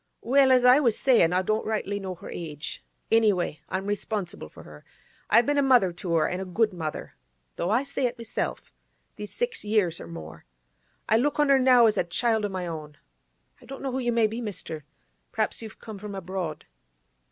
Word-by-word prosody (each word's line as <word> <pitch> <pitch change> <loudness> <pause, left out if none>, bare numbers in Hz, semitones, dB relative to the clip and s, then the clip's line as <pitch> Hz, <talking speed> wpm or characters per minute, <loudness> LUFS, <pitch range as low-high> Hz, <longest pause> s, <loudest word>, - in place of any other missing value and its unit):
'Well, 265 +2 +4
as 250 -1 +5
I 250 +3 +8
was 235 -7 +2
sayin', 235 -11 +4
I 185 +1 +1
don't 215 +3 0
rightly 205 -2 -2
know 190 -2 -5
her - - -10
age. 155 -3 -6 0.3
Any 225 -1 +5
way, 175 -5 -2
I'm 190 +1 -3
responsible 205 - -3
for - - -14
her. 75 -1 -13 0.5
I've 235 - +5
been 290 +1 +2
a - - +4
mother 245 -10 +4
to 170 -1 -3
her, 160 - +3
an' 180 - -3
a - - -3
good 210 +3 +1
mother—though 150 - -7
I 235 +6 +2
say 275 -2 -1
it 245 +1 -6
myself—these 220 -2 -7
six 485 -1 -2
years 205 -6 +1
or - - -9
more. 80 -2 -10 0.6
I 220 - +4
look 290 +5 0
on 295 -1 +3
her 275 -1 +6
now 255 -2 +6
as 215 - +3
a - - +3
child 220 +5 0
o' - - -2
my 185 -2 -4
own. 155 -3 -7 0.6
I - - -16
don't 270 - -8
know 270 - -2
who 260 - -2
you 240 -2 0
may 230 -1 +3
be, 225 +3 -3
mister. 180 -8 -6 0.5
P'r'aps 220 +1 -1
you've 220 -1 -9
come 215 -3 -9
from 205 0 -7
abroad? 180 -4 -5
210 Hz, 205 wpm, -26 LUFS, 175-240 Hz, 0.6 s, I